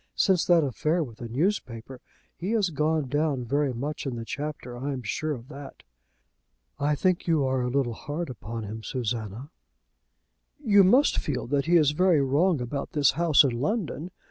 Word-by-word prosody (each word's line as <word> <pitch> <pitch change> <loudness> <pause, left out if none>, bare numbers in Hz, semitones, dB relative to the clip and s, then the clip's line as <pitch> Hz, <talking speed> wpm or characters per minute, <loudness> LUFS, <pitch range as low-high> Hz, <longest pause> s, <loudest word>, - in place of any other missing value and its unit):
Since 185 -3 +3
that 170 -2 +4
affair 155 +6 0
with 115 -6 -10
the 120 - -7
newspaper, 130 - -2 0.3
he 190 +6 -3
has 205 -6 +1
gone 155 -1 0
down 145 -2 0
very 140 +3 0
much 140 +5 -4
in 130 - -3
the 115 -1 -6
Chapter. 140 -2 -5
I 135 +4 -3
am 130 -2 -6
sure 150 +8 -2
of 120 -2 -9
that." 140 -1 -10 1.0
"I 150 +1 +1
think 180 +5 0
you 160 -5 +2
are 130 -1 0
a 125 - -1
little 125 -2 0
hard 150 +8 -5
upon 115 0 -7
him, 110 +2 -6
Susanna." 115 - -4 1.1
"You 205 -8 +5
must 250 +10 +4
feel 145 -4 -3
that 140 +2 0
he 175 - +4
is 150 -3 +4
very 175 +1 +3
wrong 145 +5 +2
about 130 +3 -4
this 145 -3 +4
house 165 0 +4
in 135 - +1
London. 180 - -2
145 Hz, 180 wpm, -26 LUFS, 125-165 Hz, 1.1 s, You